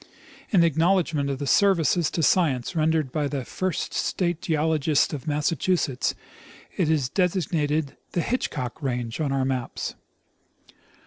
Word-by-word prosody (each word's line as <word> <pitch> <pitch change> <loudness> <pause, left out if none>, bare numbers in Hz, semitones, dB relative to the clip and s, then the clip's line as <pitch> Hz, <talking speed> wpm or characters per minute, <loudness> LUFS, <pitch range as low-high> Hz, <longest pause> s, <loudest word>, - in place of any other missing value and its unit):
In 185 -6 +4
acknowledgment 165 -2 +2
of 135 - -2
the 145 - -4
services 175 0 +3
to 165 - -2
science 150 -5 +2
rendered 155 -3 +1
by 150 0 0
the 140 -3 -4
first 185 +5 -3
state 175 -3 -1
geologist 155 -2 +1
of 150 +1 -6
Massachusetts, 150 -1 0 0.6
it 175 -5 +1
is 150 -5 +2
designated 160 -4 0 0.2
the 175 - +1
Hitchcock 160 - -3
range 125 -1 -3
on 145 -3 0
our 135 -1 +1
maps. 130 -2 -3
155 Hz, 130 wpm, -25 LUFS, 140-170 Hz, 0.6 s, In